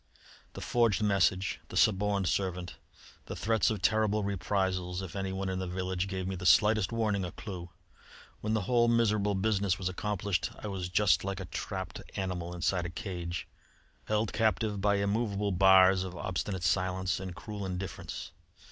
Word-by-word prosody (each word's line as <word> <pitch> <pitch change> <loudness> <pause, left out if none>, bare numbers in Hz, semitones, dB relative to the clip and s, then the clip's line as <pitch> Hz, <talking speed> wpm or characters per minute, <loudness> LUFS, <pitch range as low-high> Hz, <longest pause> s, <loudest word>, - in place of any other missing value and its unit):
"The - - -8
forged 115 -3 +2
message, 95 -2 +2
the - - -5
suborned 100 -1 +3
servant, 90 -2 -2 0.5
the - - -5
threats 110 -1 +2
of 105 -5 -3
terrible 110 -1 +2
reprisals 95 -2 -1
if 95 -1 -7
anyone 95 0 -2
in 95 0 -2
the 95 - -3
village 95 +1 -2
gave 95 -1 -3
me 95 - -2
the 90 - -7
slightest 105 -2 +5
warning 110 -4 0
or 90 - -3
clue. 90 -2 -7 0.7
When 110 +1 -1
the 110 - +1
whole 120 +4 +3
miserable 105 -3 +2
business 100 -2 +1
was 90 -1 -2
accomplished, 100 -1 -1
I 105 - -6
was 95 -3 -4
just 100 +1 +3
like 100 0 -3
a 95 - -5
trapped 95 +1 -5
animal 90 -3 -3
inside 90 0 0
a - - -6
cage, 85 -1 -5 0.6
held 105 0 0
captive 110 -2 +1
by 100 0 +3
immovable 100 0 0
bars 95 0 +6
of 90 -1 -6
obstinate 95 0 -3
silence 95 +1 +1
and 95 -2 -6
cruel 105 -2 -6
indifference. 95 -1 -5
95 Hz, 165 wpm, -30 LUFS, 90-105 Hz, 0.7 s, bars